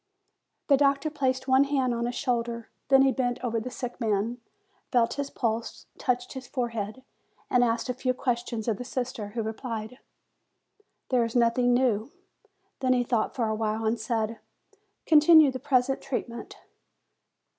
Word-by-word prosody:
The 280 - +5
doctor 280 +2 +2
placed 260 -2 -1
one 265 +1 +5
hand 265 -3 +1
on 235 0 -1
his 245 - -4
shoulder; 235 -2 -2 0.2
then 270 0 +5
bent 245 -2 -1
over 230 -2 0
the 225 - -5
sick 245 0 -6
man, 220 +2 0 0.5
felt 240 -3 +3
his 280 -1 -3
pulse, 230 -1 -3
touched 245 -1 -1
his 260 -2 -8
forehead, 235 -2 -3 0.5
and 250 -1 +4
asked 230 +1 0
a 250 - -1
few 255 +1 -1
questions 240 -3 -2
of 220 -3 +1
the - - -5
sister, 250 -3 -4
who 230 - -1
replied, 220 +1 -5 1.1
"There 250 -2 +3
is 230 +1 -4
nothing 245 +1 +3
new." 245 -1 +1 0.7
Then 255 -1 +2
he 250 -1 +2
thought 235 -3 -1
for 235 -4 0
a 220 - 0
while 220 0 -1
and 225 +1 +1
said, 225 0 -2 0.7
"Continue 310 -2 +7
the 260 - -5
present 265 -1 +1
treat 275 -2 -3
ment." 235 0 -9
245 Hz, 160 wpm, -27 LUFS, 230-260 Hz, 1.1 s, Continue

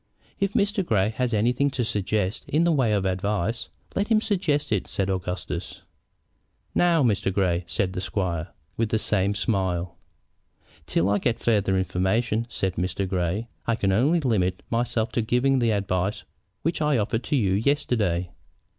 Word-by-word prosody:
"If 200 0 0
Mr. 200 0 +1
Grey 105 - +2
has 125 -2 0
anything 120 +6 +2
to 120 - +1
suggest 105 -1 -1
in 155 +4 +2
the 170 - +3
way 130 -8 +2
of 100 -2 +1
advice, 100 +3 -1 0.3
let 200 - +1
him 220 -2 +4
suggest 175 - 0
it," 105 -4 0
said 95 0 -1
Augustus. 90 -1 -4 0.9
"Now, 170 -4 +4
Mr. 105 -5 +1
Grey," 90 -3 +1
said 90 +2 -1
the 90 - -3
squire, 90 -3 -2 0.3
with 115 -1 +1
the 110 - +2
same 100 -2 +1
smile. 95 -4 -1 0.9
"Till 85 - +1
I 100 0 +2
get 120 +3 0
farther 100 -4 +2
information," 95 +5 0
said 95 -5 -2
Mr. 90 +2 -1
Grey, 90 +4 -1 0.2
"I 115 - +2
can 100 -3 +1
only 140 - +3
limit 95 -9 0
myself 115 -1 0
to 120 - 0
giving 125 +4 +2
the 120 -2 +2
advice 100 -1 -1 0.4
which 165 0 -1
I 150 -3 +3
offered 115 +2 -1
to - - 0
you 100 -8 +2
yesterday." 105 - +1
105 Hz, 165 wpm, -25 LUFS, 95-125 Hz, 0.9 s, him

